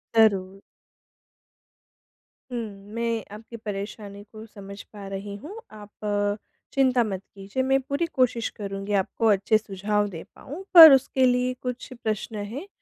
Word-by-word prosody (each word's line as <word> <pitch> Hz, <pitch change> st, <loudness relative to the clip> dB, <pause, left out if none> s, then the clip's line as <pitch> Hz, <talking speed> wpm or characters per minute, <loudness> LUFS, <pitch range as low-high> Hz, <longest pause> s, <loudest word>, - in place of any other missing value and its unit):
ज़रूर। 195 Hz, -3 st, +3 dB, 1.9 s
हुँ, 240 Hz, -, -2 dB, 0.3 s
मैं 230 Hz, -1 st, -1 dB
आपकी 230 Hz, +2 st, -10 dB
परेशानी 205 Hz, -1 st, -7 dB
को 220 Hz, 0 st, -10 dB
समझ 200 Hz, -2 st, -11 dB
पा 200 Hz, -2 st, -11 dB
रही 195 Hz, +1 st, -6 dB
हूँ, 380 Hz, +8 st, -8 dB, 0.2 s
आप 210 Hz, -1 st, -12 dB, 0.8 s
चिंता 255 Hz, -3 st, +3 dB
मत 195 Hz, -3 st, -4 dB
कीजिए 200 Hz, +7 st, -3 dB
मैं 270 Hz, +1 st, +2 dB
पूरी 280 Hz, +5 st, -2 dB
कोशिश 245 Hz, -3 st, +1 dB
करूँगी 200 Hz, 0 st, -5 dB
आपको 225 Hz, -, -4 dB
अच्छे 200 Hz, +2 st, +3 dB
सुझाव 205 Hz, 0 st, -1 dB
दे 165 Hz, -3 st, -8 dB
पाऊँ 320 Hz, +8 st, -9 dB
पर 325 Hz, -4 st, +12 dB
उसके 265 Hz, 0 st, +3 dB
लिए 250 Hz, 0 st, +2 dB
कुछ 250 Hz, +1 st, -5 dB
प्रश्न 215 Hz, 0 st, -3 dB, 0.2 s
हैं 290 Hz, +11 st, -6 dB
220 Hz, 135 wpm, -25 LUFS, 200-250 Hz, 1.9 s, पर